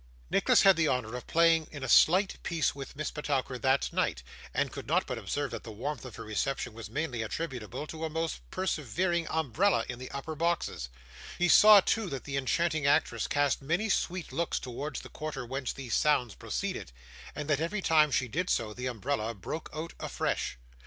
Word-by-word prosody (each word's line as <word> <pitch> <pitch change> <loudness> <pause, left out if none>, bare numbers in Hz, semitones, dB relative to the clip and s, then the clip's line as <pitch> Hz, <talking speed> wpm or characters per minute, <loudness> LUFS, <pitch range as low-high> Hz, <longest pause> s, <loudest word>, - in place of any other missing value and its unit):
Nicholas - - +4
had 195 -2 +7
the 160 -2 +3
honour 125 -3 -1
of 125 - -7
playing 165 -1 +4
in 145 -3 -8
a - - -2
slight 185 - +5
piece 165 -3 0
with 140 0 -8
Miss 155 +1 -3
Petowker 135 -3 -2
that 135 +1 +1
night, 60 - 0 0.3
and - - 0
could - - -8
not - - +2
but - - -4
observe 145 -2 -2
that - - -6
the 115 - -8
warmth 125 +6 -4
of 125 - -9
her - - -7
reception 120 +3 -2
was 115 0 -8
mainly 140 -6 -2
attributable 125 +1 -4
to 160 +1 -7
a 160 - -1
most 165 +1 -2
persevering 170 - -1
umbrella 160 - +1
in 125 -1 -6
the 130 - -7
upper 140 +3 -5
boxes; 165 - -1 0.5
he 180 - +2
saw, 210 +3 +9
too, 220 0 0
that 135 -4 -5
the 140 - -5
enchanting 155 +2 +1
actress 120 -5 +2
cast 145 -1 +1
many 170 +10 0
sweet 180 -5 -1
looks 165 +5 -1
towards 130 +3 -5
the - - -11
quarter 145 -3 -5
whence 130 +1 -3
these 130 -4 -6
sounds 125 -7 +2
proceeded; - - -4 0.4
and 150 0 -4
that 150 -1 +1
every 195 +5 -2
time 155 -2 +5
she 130 -1 +1
did 180 +10 -2
so, 110 -2 0
the 125 +3 -4
umbrella 120 -1 -2
broke 155 - -6
out 160 +2 -5
afresh. - - -2
145 Hz, 195 wpm, -30 LUFS, 125-165 Hz, 0.5 s, saw